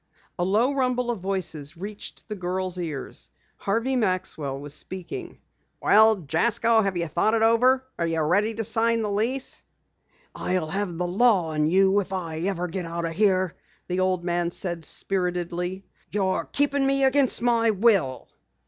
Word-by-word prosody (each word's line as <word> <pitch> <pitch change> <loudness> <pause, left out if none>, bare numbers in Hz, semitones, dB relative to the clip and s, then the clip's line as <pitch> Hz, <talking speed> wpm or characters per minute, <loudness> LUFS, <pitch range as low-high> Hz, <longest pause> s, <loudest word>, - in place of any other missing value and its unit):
A - - +2
low 220 +9 +2
rumble 250 -2 0
of 230 - -4
voices 175 -5 -4
reached 200 +3 -8
the 215 - -4
girl's 185 0 -2
ears. 155 -6 -5 0.3
Harvey 230 +6 0
Maxwell 185 - -1
was 145 0 -7
speaking: 190 - -6 0.4
"Well, 220 +1 +6
Jasko, 225 +7 +3
have 195 -3 -1
you 170 -1 -1
thought 175 +8 +1
it 225 - +2
over? 250 +4 +4
Are 170 - +1
you 165 0 -1
ready 205 +8 +1
to 225 - -2
sign 230 +1 +2
the 210 - -2
lease?" 240 +6 -1 0.7
"I'll 180 -4 -2
have 195 -3 -2
the 180 0 -1
law 195 -3 +3
on 150 -1 +1
you, 190 +3 +4
if 195 -1 -4
I 165 -4 -4
ever 180 0 -1
get 180 +1 -4
out 170 0 -3
of 165 - -2
here!" 185 -2 +2 0.3
the 180 0 -1
old 185 -1 +1
man 175 -1 0
said 175 -2 -4
spiritedly. 180 0 -2 0.2
"You're 190 -5 0
keepin' 280 -1 +2
me 275 0 +3
against 265 -2 +3
my 230 -1 +3
will." 195 - +2
190 Hz, 165 wpm, -25 LUFS, 175-225 Hz, 0.7 s, Well